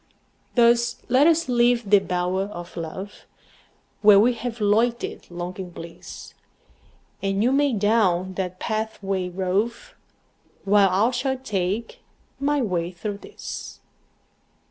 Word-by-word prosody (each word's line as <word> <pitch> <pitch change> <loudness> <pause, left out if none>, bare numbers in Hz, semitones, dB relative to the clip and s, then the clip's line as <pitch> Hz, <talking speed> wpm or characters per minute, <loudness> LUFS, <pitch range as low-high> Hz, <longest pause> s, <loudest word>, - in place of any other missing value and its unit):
Thus 235 0 +3
let 260 +5 +5
us 330 0 +3
leave 240 -2 +2
the 205 - +8
bower 180 +1 -1
of 175 -4 -9
love, 175 +5 -7 0.7
Where 205 -2 +8
we 240 +4 +4
have 235 0 -5
loitered 225 +3 0
long 175 +1 -6
in 185 -2 -5
bliss; 165 -1 -10 0.9
And 195 +1 0
you 250 - +3
may 285 +1 +3
down 195 -4 +2
that 185 -1 -4
pathway 200 -4 -2
rove, 200 - -2 0.7
While 200 0 +4
I 200 +6 +2
shall 265 +2 -1
take 210 -3 -3 0.4
my 285 0 +1
way 175 -5 -1
through 200 +3 -5
this. - - -8
205 Hz, 120 wpm, -24 LUFS, 185-240 Hz, 0.9 s, the